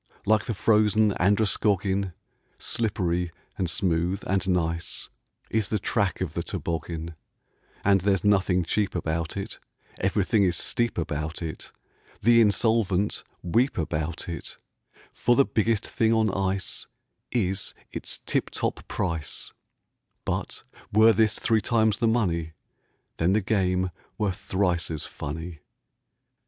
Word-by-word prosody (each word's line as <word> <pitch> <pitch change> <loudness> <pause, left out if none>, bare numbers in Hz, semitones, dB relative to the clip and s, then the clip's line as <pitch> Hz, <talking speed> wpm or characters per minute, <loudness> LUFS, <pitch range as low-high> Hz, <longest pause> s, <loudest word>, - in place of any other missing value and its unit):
Like 110 0 +3
the 115 -4 -2
frozen 105 0 +3
Androscoggin, 100 -1 +2 0.4
Slippery, 90 -6 0 0.2
and 90 -3 -1
smooth, 85 +2 0
and 95 0 0
nice, 85 -2 -1 0.4
Is 110 -2 +1
the 110 - +1
track 100 -2 0
of - - -2
the - - -1
toboggan; 85 0 -4 0.7
And 100 -1 +4
there's 95 -1 +2
nothing 95 -3 +3
cheap 100 +4 0
about 80 0 -2
it, 100 +3 -5 0.4
Everything 100 +2 +2
is 90 -3 +2
steep 120 0 0
about 80 0 -3
it, 80 -1 -6 0.5
The 115 +2 +6
insolvent 105 -2 +2 0.2
weep 115 +10 +2
about 80 0 -2
it, 85 -2 -6 0.6
For 120 - +2
the 140 - +5
biggest 110 0 +1
thing 110 -1 +1
on 110 -2 +3
ice 95 0 -2 0.4
Is 95 -5 0 0.2
its - - -4
tip - - 0
top - - -3
price; 80 -4 -3 0.7
But - - -3 0.3
were 110 +2 +6
this 110 +1 +3
three 110 -1 +2
times 110 -1 +2
the 115 - +3
money, 85 -8 0 0.6
Then 85 +4 +2
the 105 - +4
game 95 -3 +1 0.3
were 105 -3 +1
thrice 90 -2 0
as 80 -3 -3
funny. 80 +2 -6
95 Hz, 125 wpm, -26 LUFS, 85-110 Hz, 0.7 s, The